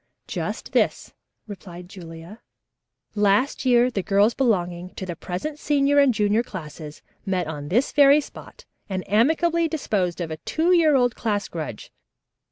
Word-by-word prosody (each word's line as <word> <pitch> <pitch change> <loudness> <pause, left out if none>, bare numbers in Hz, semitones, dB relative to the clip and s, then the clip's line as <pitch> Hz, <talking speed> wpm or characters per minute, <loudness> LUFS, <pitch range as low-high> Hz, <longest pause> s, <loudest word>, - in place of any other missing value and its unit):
"Just - - -5
this," - - 0 0.3
replied 180 -4 -10
Julia. 170 +2 -11 0.7
"Last 210 +7 +1
year 245 0 +4
the 200 - -2
girls 200 +4 +2
belonging 180 -8 -1
to 190 - -5
the 175 -2 -5
present 195 - -5
senior 285 -1 +2
and 280 -2 +5
junior 210 0 +1
classes 155 -8 -9 0.2
met 185 -3 -1
on 150 -2 -6
this 235 - +1
very 285 0 +6
spot 295 - -11 0.2
and 185 -1 -4
amicably 325 - +2
disposed 205 - -2
of 165 -2 -4
a 155 - -4
two 325 - 0
year 325 -5 +4
old 245 -2 +2
class 205 -3 -2
grudge. 155 -10 -7
205 Hz, 150 wpm, -23 LUFS, 180-275 Hz, 0.7 s, very